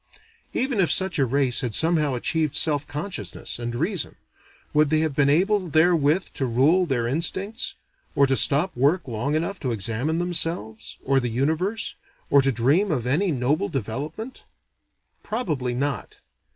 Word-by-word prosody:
Even 255 -4 0
if 175 -5 +3
such 190 -4 +1
a 135 - +3
race 130 -1 +2
had 120 -4 -2
somehow 155 -4 +2
achieved 155 +4 -1
self 150 -2 +3
consciousness 150 -1 -4
and 120 0 -4
reason, 165 - -1 0.6
would 150 -1 +3
they 155 0 +2
have 160 -2 -1
been 140 -1 +3
able 185 +4 +2
therewith 160 +1 +2
to 135 - -2
rule 150 +10 +3
their 125 -5 0
instincts, 190 - -1 0.4
or 140 - +5
to 135 0 +1
stop 150 +8 +3
work 145 +7 +1
long 125 +5 -2
enough 170 +5 -2
to 130 -5 -2
examine 115 - -1
themselves, 165 -11 -2
or 135 0 +2
the 125 -2 -2
universe, 160 - -1 0.4
or 140 - +6
to 135 0 +1
dream 140 - +2
of 125 -6 -1
any 165 +9 +1
noble 150 +9 0
development? 145 - -5 0.8
Probably 150 - -3
not. 140 +1 -3
150 Hz, 155 wpm, -24 LUFS, 130-175 Hz, 0.8 s, or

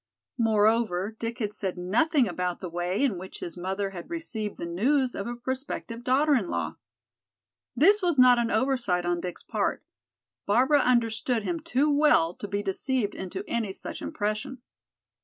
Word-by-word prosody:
Moreover, 215 -2 +2
Dick 230 +1 -3
had 210 -3 -3
said 190 -3 -3
nothing 240 - +2
about 180 -1 -2
the 180 -3 -6
way 175 +7 -1
in 220 -10 +1
which 190 +1 -8
his 170 - -6
mother 190 +2 -3
had 180 - -9
received 250 -11 -4
the - - -5
news 250 +10 +1
of 200 - -4
a 240 - -4
prospective 245 -1 -5
daughter 280 +4 +3
in 220 -10 +1
law. - - -3 1.0
This 395 - +5
was 350 -5 +1
not 250 -1 +7
an 235 -1 0
oversight 230 -6 +1
on 175 0 0
Dick's 180 -1 -6
part; - - -1 0.6
Barbara 255 +8 +4
understood 235 -2 +1
him 335 +8 -2
too 295 -2 +1
well 285 - +4
to 205 - -7
be 200 +1 -2
deceived 210 +2 0
into 190 +1 -5
any 225 -4 -1
such - - -7
impression. 215 +4 -3
225 Hz, 165 wpm, -27 LUFS, 190-260 Hz, 1.0 s, not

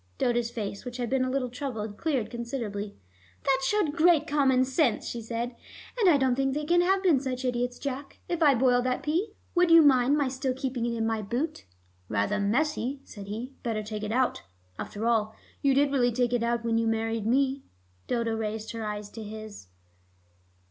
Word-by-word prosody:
Dodo's 240 -1 +1
face, 205 -4 -5
which 250 0 -6
had 245 -1 -3
been 265 -1 +2
a 255 - -1
little 255 -2 -1
troubled, 225 -5 -4
cleared 270 -5 -1
considerably. 230 -4 -4 0.5
"That 270 -1 +3
showed 340 -1 +1
great 330 -2 +5
commonsense," 265 -2 +2
she 235 - -4
said. 235 +2 -4 0.5
"I 325 -5 +6
don't 265 -2 +2
think 270 +1 0
they 300 0 -2
can 345 +3 +4
have 380 +2 +2
been 335 -8 +4
such 260 -1 -3
idiots. 245 0 -1
Jack, 275 0 -5
if 345 -1 -2
I 290 -4 +6
boil 245 0 +3
that 255 0 -1
pea, 355 +8 -1 0.2
would 355 -1 +4
you 330 -1 +8
mind 270 0 +5
my 285 -2 +2
still 260 0 -2
keeping 255 -3 -2
it 235 -1 -2
in 225 - 0
my 225 -1 0
boot?" 250 +10 -3 0.4
"Rather 105 - 0
messy," 265 +5 0
said 200 -6 -10
he. 230 +6 -5
"Better 220 -3 -2
take 210 0 -5
it 210 0 -3
out. 255 +2 +1 0.4
After 210 +2 -4
all, 220 -2 +1 0.3
you 275 -2 +3
did 280 0 +3
really 245 -3 +3
take 245 +1 0
it 240 - +2
out 235 0 0
when 230 0 +2
you 230 - +1
married 225 -1 -1
me." 270 +2 +2 0.5
Dodo 235 -2 0
raised 220 0 -3
her 230 -1 -5
eyes 210 -1 -4
to 225 - -8
his. 215 - -8
245 Hz, 195 wpm, -28 LUFS, 225-275 Hz, 0.5 s, you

